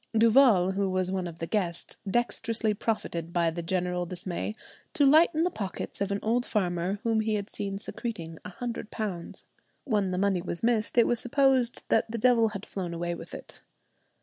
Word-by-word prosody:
Duval, 225 Hz, -5 st, +6 dB
who 195 Hz, 0 st, 0 dB
was 185 Hz, 0 st, 0 dB
one 185 Hz, -2 st, -1 dB
of 165 Hz, -1 st, -8 dB
the 165 Hz, -, -3 dB
guests, 175 Hz, -3 st, -2 dB
dexterously 230 Hz, -1 st, 0 dB
profited 170 Hz, -6 st, -2 dB
by 170 Hz, -2 st, +2 dB
the 170 Hz, +1 st, -4 dB
general 180 Hz, 0 st, -1 dB
dismay 180 Hz, +3 st, -4 dB, 0.4 s
to 290 Hz, -4 st, +4 dB
lighten 315 Hz, +3 st, +5 dB
the 360 Hz, -, +1 dB
pockets 200 Hz, -4 st, -5 dB
of 200 Hz, 0 st, 0 dB
an 200 Hz, -, +1 dB
old 235 Hz, +3 st, +2 dB
farmer 180 Hz, -4 st, -1 dB
whom 225 Hz, -1 st, +2 dB
he 220 Hz, 0 st, +1 dB
had 205 Hz, 0 st, -4 dB
seen 195 Hz, -1 st, -3 dB
secreting 195 Hz, -7 st, -6 dB
a -, -, -7 dB
hundred 230 Hz, +2 st, -5 dB
pounds. 195 Hz, -7 st, -5 dB, 0.4 s
When 210 Hz, -7 st, +1 dB
the 180 Hz, -, -2 dB
money 190 Hz, -2 st, +2 dB
was 170 Hz, +1 st, -5 dB
missed 230 Hz, -1 st, +1 dB
it 235 Hz, -, +7 dB
was 240 Hz, -, +1 dB
supposed 260 Hz, -1 st, +2 dB
that -, -, +2 dB
the 230 Hz, -, -3 dB
devil 230 Hz, -1 st, +4 dB
had 200 Hz, -1 st, -7 dB
flown 175 Hz, -3 st, -4 dB
away 175 Hz, +1 st, -2 dB
with 170 Hz, -, -8 dB
it. -, -, -11 dB
200 Hz, 190 wpm, -28 LUFS, 180-230 Hz, 0.4 s, it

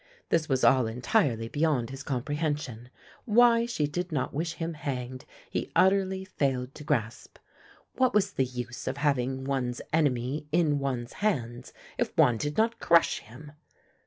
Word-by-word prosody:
This 160 Hz, -2 st, +1 dB
was 130 Hz, -2 st, +1 dB
all 130 Hz, -3 st, +5 dB
entirely 120 Hz, -, +1 dB
beyond 145 Hz, -3 st, 0 dB
his 135 Hz, 0 st, -7 dB
comprehension; 145 Hz, -3 st, -3 dB, 0.4 s
why 235 Hz, +1 st, +5 dB
she 160 Hz, -11 st, 0 dB
did 175 Hz, +5 st, -3 dB
not 140 Hz, -5 st, -2 dB
wish 160 Hz, +3 st, -2 dB
him 165 Hz, 0 st, -4 dB
hanged 130 Hz, -4 st, -5 dB, 0.2 s
he -, -, -4 dB
utterly 190 Hz, 0 st, +3 dB
failed 135 Hz, -7 st, -1 dB
to 150 Hz, -, -10 dB
grasp. 120 Hz, -7 st, -2 dB, 0.6 s
What 255 Hz, -1 st, +3 dB
was 200 Hz, -1 st, +2 dB
the 130 Hz, -, +1 dB
use 125 Hz, -1 st, -6 dB
of 135 Hz, -, -2 dB
having 135 Hz, -2 st, 0 dB
one's 130 Hz, -3 st, -2 dB
enemy 145 Hz, -1 st, 0 dB
in 155 Hz, -3 st, +2 dB
one's 125 Hz, -4 st, -3 dB
hands 125 Hz, -, -1 dB, 0.3 s
if -, -, -1 dB
one 120 Hz, -2 st, +5 dB
did 145 Hz, +5 st, -3 dB
not 230 Hz, +1 st, +2 dB
crush 170 Hz, 0 st, +4 dB
him? 135 Hz, +7 st, -13 dB
145 Hz, 155 wpm, -28 LUFS, 125-165 Hz, 0.6 s, all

